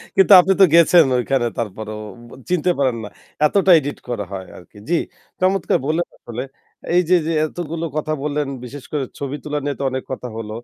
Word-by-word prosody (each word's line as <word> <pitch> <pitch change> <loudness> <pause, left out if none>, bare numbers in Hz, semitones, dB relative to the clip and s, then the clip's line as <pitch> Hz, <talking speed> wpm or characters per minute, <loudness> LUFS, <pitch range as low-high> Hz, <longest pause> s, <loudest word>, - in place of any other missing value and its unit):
কিন্তু 195 +1 +4
আপনি 195 +2 +4
তো 190 - +10
গেছেন 170 0 +7
ঐখানে 125 0 0
তারপরেও 110 0 -5 0.5
চিনতে 180 0 +2
পারেন 130 -4 +1
না। - - -6 0.4
এতটা 190 +3 +3
এডিট 145 0 -5
করা 110 -4 -3
হয় 95 -1 -6
আরকি। 90 +4 -17
জ্বি, 175 - +3 0.5
চমৎকার 190 -1 +2
বললেন 160 +3 0
আসলে 120 +2 -6 0.5
এই 180 - +5
যে, 180 - +6
যে 165 - 0
এতগুলো 165 0 -5
কথা 155 0 -1
বললেন 150 -1 -1 0.2
বিশেষ 135 +2 -9
করে 145 -3 -1 0.2
ছবি 140 0 -4
তোলা 150 0 -2
নিয়ে 145 -1 -2
তো - - -2
অনেক 130 0 -3
কথা 125 -1 -5
হল। 110 -1 -6
145 Hz, 185 wpm, -20 LUFS, 125-170 Hz, 0.5 s, তো